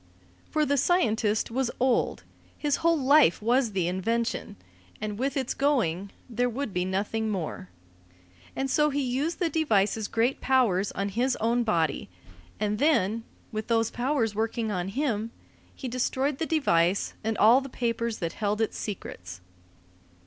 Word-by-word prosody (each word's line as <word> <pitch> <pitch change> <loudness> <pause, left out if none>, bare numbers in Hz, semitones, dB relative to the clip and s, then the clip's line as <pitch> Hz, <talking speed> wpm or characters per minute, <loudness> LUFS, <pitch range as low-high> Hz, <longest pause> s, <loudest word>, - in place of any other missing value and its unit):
For 305 -1 +1
the 285 0 +1
scientist 225 - +1
was 255 +1 0
old, 255 -1 +1 0.3
his 290 -2 0
whole 335 0 +3
life 280 - +5
was 235 +1 +1
the 185 -3 0
invention, 210 +3 -1 0.4
and 210 0 -4
with 275 +2 -1
its 260 -2 -1
going 200 - 0 0.2
there 245 +1 0
would 245 -2 -4
be 180 0 0
nothing 205 +4 -1
more. 170 - -4 0.9
And 270 - -1
so 300 +3 +3
he 285 0 -1
used 270 +7 -1
the 350 - +1
device's 220 -10 +1
great 235 +4 0
powers 220 -8 +2
on 200 +1 -2
his 245 +5 0
own 235 +2 +1
body; 165 - 0 0.5
and 210 0 -1
then, 230 -7 +2 0.3
with 215 -1 -4
those 225 -1 +1
powers 245 -3 0
working 220 +1 -1
on 180 -2 -2
him, 225 -1 -1 0.5
he 265 - -6
destroyed 260 +3 -1
the 320 - -1
device 190 - +2
and 220 0 -1
all 235 +5 +6
the 275 - -8
papers 235 -2 -2
that 170 -2 -3
held 210 0 -1
its 225 - -1
secrets. 90 - -6
230 Hz, 155 wpm, -27 LUFS, 205-265 Hz, 0.9 s, all